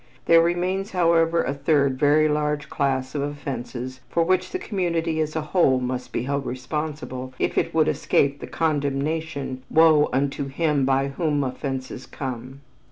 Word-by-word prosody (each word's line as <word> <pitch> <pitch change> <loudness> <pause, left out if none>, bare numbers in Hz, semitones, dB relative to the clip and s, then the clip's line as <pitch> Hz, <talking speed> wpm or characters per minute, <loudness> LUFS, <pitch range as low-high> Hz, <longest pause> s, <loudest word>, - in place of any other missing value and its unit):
There 165 0 +6
remains, 180 +4 -1
however, 170 -2 +3
a 140 - -1
third 140 -2 +1
very 150 +2 +4
large 150 -1 -1
class 130 -2 -1
of 145 - -2
offenses 130 -3 -5
for 170 - +2
which 185 +2 +1
the 370 - -3
community 170 - -1
as 155 0 -1
a 160 - 0
whole 150 -4 +2
must 125 0 -4
be 115 - -2
held 140 +1 -2
responsible 130 -1 -5
if - - -1
it - - +1
would 160 -1 +4
escape 140 0 +1
the - - -7
condemnation, 145 -2 -2
"Woe 155 -2 +5
unto 140 +1 -1
him 145 -1 +1
by 135 +1 +2
whom 145 -1 0
offenses 130 0 -5
come." 130 0 -6
145 Hz, 160 wpm, -24 LUFS, 135-160 Hz, -, There